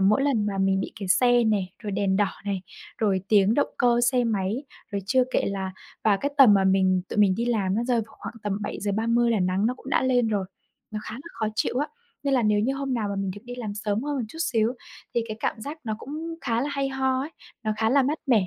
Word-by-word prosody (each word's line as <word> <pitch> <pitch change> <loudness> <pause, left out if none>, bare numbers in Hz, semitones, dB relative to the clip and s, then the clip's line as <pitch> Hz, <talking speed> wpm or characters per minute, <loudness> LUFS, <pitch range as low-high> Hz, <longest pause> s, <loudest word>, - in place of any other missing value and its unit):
mỗi 210 +7 +4
lần 250 -7 +2
mà 200 -2 -2
mình 195 0 +2
bị - - -4
kẹt 190 -2 -3
xe 245 +2 +5
nè, 210 -4 +2
rồi 215 -3 -5
đèn 195 -1 +1
đỏ 205 -1 +3 0.2
này, 195 -2 -2 0.4
rồi 200 -4 +2
tiếng 205 0 +5
động 285 - +2
cơ 240 -1 +4
xe 250 -1 +2
máy 215 +4 -1 0.3
rồi 200 - -1
chưa 255 +3 +4
kể - - +2
là 190 -1 -3 0.3
và 210 -2 +5
cái 285 +8 -2
tầm 250 -7 +9
mà 195 -1 +3
mình 190 -1 +3
tụi - - -5
mình 200 -3 +5
đi 230 +4 -1
làm 205 -6 +1
nó 230 - 0
rơi 245 0 +2
vào - - -18
khoảng - - -7
tầm 205 -1 -1
7:30 225 +4 +1
là 220 -3 +2
nắng 185 +3 +1
nó 250 - 0
cũng 260 - -10
đã - - +3
lên 250 -3 +3
rồi, 200 -3 0 0.4
nó 215 -1 -4
khá - - -7
là 245 - -8
khó 225 -1 -2
chịu 245 - 0
á. 290 - +1 0.4
Nên 280 -1 +1
là 250 - +3
nếu 210 -1 +3
như 260 +6 +1
hôm 275 -1 -2
nào 220 -4 -1
mà 200 - -3
mình 195 -1 -1
được 200 +2 -8
đi 245 0 -7
làm 215 -5 -4
sớm 210 +1 -1
hơn 290 0 -2
một 260 - -1
chút 320 - -11
xíu 235 -5 +1 0.4
thì 235 - +2
cái 215 - -4
cảm - - -1
giác 290 +7 -6
nó 220 -2 -2
cũng 315 +6 -6
khá 230 -5 0
là 280 - -1
hay 275 -1 0
ho 265 -1 0
ấy, 285 +4 -4 0.3
nó 215 - 0
khá 220 0 +1
là 275 +2 +5
mát 290 +4 0
mẻ. 225 -8 +4
220 Hz, 265 wpm, -25 LUFS, 200-255 Hz, 0.4 s, tầm